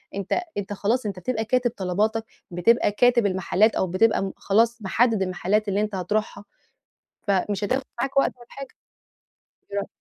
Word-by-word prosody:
أنت 200 - -1 0.2
أنت 205 0 -3
خلاص 220 +4 0
أنت 195 -3 -4
بتبقى 220 +3 -2
كاتب 245 0 +1
طلباتك 210 +4 0 0.3
بتبقى 205 +5 +3
كاتب 240 -2 +4
المحلات 195 +3 +2
أو 190 - +1
بتبقى 210 +5 +2
م 190 - -4
خلاص 230 +3 +2
محدد 220 +1 +2
المحلات 190 +3 0
اللي 200 +1 0
أنت 210 -2 -2
هتروحها 205 +2 -2 0.8
فمش 200 +1 0
هتاخد 260 +6 0 0.2
معاك 270 +2 -2
وقت - - +3
ولا 240 - -15
حاجة. 275 -1 -8 1.0
إيه 200 - -1
رأي - - -2
210 Hz, 160 wpm, -24 LUFS, 195-230 Hz, 1.0 s, كاتب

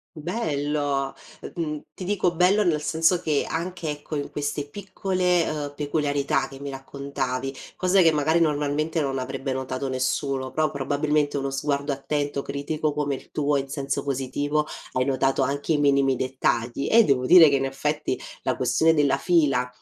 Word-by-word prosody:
Bello! 145 -5 -1 0.3
Eh - - -8
mhmm, 150 -3 -3
ti 185 - -7
dico: 185 -2 +1
"Bello", 190 +4 +4
nel 155 -4 +1
senso 165 +3 +2
che, 150 -3 0
anche, 170 0 -3
ecco, 150 +1 -5
in 145 - -3
queste 145 0 -3
piccole, 185 -1 0
uhm, 145 -2 -3
peculiarità 145 -2 0
che 135 0 -12
mi 140 - -5
raccontavi, 135 -1 -4 0.2
cosa 185 +1 +3
che, 165 -2 +5
magari, 155 +2 +2
normalmente, 150 0 0
non 135 -2 -1
avrebbe 135 +1 -3
notato 130 +1 -3
nessuno, 130 +1 -1
pro, 155 +2 +1
probabilmente, 145 +1 0
uno 135 0 -2
sguardo 140 +1 -1
attento, 145 0 -2
critico 150 +2 -2
come 145 -1 -1
il 130 - -10
tuo, 145 -1 +1
in 135 0 -2
senso 140 -1 -2
positivo, 145 +3 -1 0.3
hai 130 0 0
notato 135 0 +1
anche 140 +4 0
i 150 - +2
minimi 140 -2 +3
dettagli, 130 -1 -1
e 230 +1 +7
devo 130 -2 +2
dire 165 0 +8
che, 140 - +3
in 135 - 0
effetti, 150 +3 -2 0.2
la - - 0
questione 160 0 +3
della 145 -3 +3
fila, 140 -6 +2
145 Hz, 165 wpm, -25 LUFS, 135-155 Hz, 0.3 s, dire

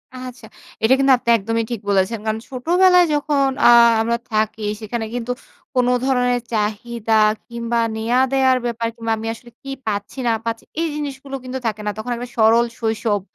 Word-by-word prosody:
আচ্ছা। 255 -2 -9 0.4
এটা 225 +4 +5
কিন্তু 275 0 +4
আপনি 240 - -5
একদমই 225 +2 -1
ঠিক 230 -4 -3
বলেছেন। 200 +3 +1
কারণ 220 0 -1
ছোটবেলায় 355 +7 +4
যখন 290 -1 +1 0.2
আ - - +8 0.3
আমরা 235 +1 0
থাকি 215 0 -1 0.2
সেখানে 225 +1 -3
কিন্তু 245 0 -3 0.4
কোন 250 -1 +3 0.2
ধরণের 250 -2 +1
চাহিদা 220 +1 -2 0.3
কিংবা 235 0 -2 0.2
নেয়া 230 +3 +1
দেওয়ার 260 -1 +4
ব্যাপার 235 -1 -2
কিংবা 230 -1 -3
আমি 220 +1 -5
আসলে 240 +1 -14
কি 275 - -9 0.2
পাচ্ছি? 205 +3 -3
না - - +3
পাচ্ছি? 230 0 -3 0.2
এই 335 - +1
জিনিসগুলো 275 -2 -5
কিন্তু 255 +1 -5
থাকে 215 -1 -3
না। - - 0
তখন 220 +3 -5
একটা 245 +1 -6
সরল 225 +1 +5
শৈশব। 220 -2 0
235 Hz, 170 wpm, -20 LUFS, 220-255 Hz, 0.4 s, আ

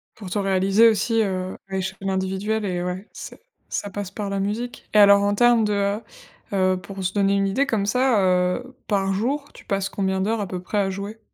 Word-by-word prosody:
Pour 200 -4 -9
te 205 +3 -1
réaliser 195 +3 +4
aussi, 225 +1 +1
heu, 185 -2 -2
à 190 - -2
échelle 190 +1 -3
individuelle? 190 +3 -1
Eh 180 -2 -2
ouais, 180 +3 -4
ç - - -9 0.4
ça 205 - -3
passe 200 -1 -5
par 200 0 -5
la 195 - -1
musique 220 +5 -4
et - - +6
alors 200 -1 +7
en 205 0 +1
termes 240 0 +4
de, 210 -1 +1
heu 200 +1 0 0.5
heu, 185 -1 +2
pour 195 0 -7
se 185 - -1
donner 200 -1 +2
une 195 0 +2
idée 270 +8 +1
comme 210 -5 0
ça, 250 +1 +2 0.4
heu, 255 +1 -11
par 195 -2 +1
jour, 275 +8 -2
tu - - -14
passes 195 -1 -1
combien 190 -1 -1
d'heures 215 +3 0
à 200 - -3
peu 180 0 -4
près 205 +3 -2
à 195 -1 +1
jouer? 200 +3 -6
200 Hz, 220 wpm, -23 LUFS, 190-215 Hz, 0.5 s, alors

